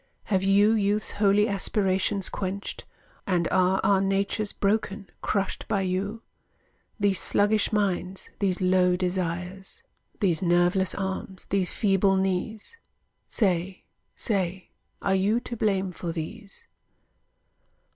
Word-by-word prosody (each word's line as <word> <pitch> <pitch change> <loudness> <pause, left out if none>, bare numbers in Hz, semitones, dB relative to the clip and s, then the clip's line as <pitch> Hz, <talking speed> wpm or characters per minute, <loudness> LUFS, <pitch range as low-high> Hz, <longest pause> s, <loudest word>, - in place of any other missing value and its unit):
Have 190 -3 0
you 200 +2 +4
youth's 210 -1 +1
holy 205 +1 +3
aspirations 195 -1 0
quenched? 195 +1 -4 0.4
And 175 -3 +1
are 185 +1 +3
our 195 -1 +4
natures 195 +2 0
broken, 200 -1 -1
crushed 195 -2 -2
by 205 -3 +1
you? 195 +4 -2 0.8
These 200 -2 +2
sluggish 205 +1 +2
minds, 195 -3 -1
these 190 -3 0
low 180 -1 +3
desires, 180 +1 -3 0.4
These 180 -7 +2
nerveless 175 +1 +2
arms, 190 -1 -4
these 190 -2 +1
feeble 195 -1 +3
knees. 195 - -2 0.5
Say, 185 -3 0 0.3
say, 190 -4 -2 0.3
are 195 - +2
you 200 +5 +2
to 240 - -6
blame 195 -4 0
for 175 -1 -5
these? 195 +6 -7
195 Hz, 115 wpm, -26 LUFS, 185-205 Hz, 0.8 s, you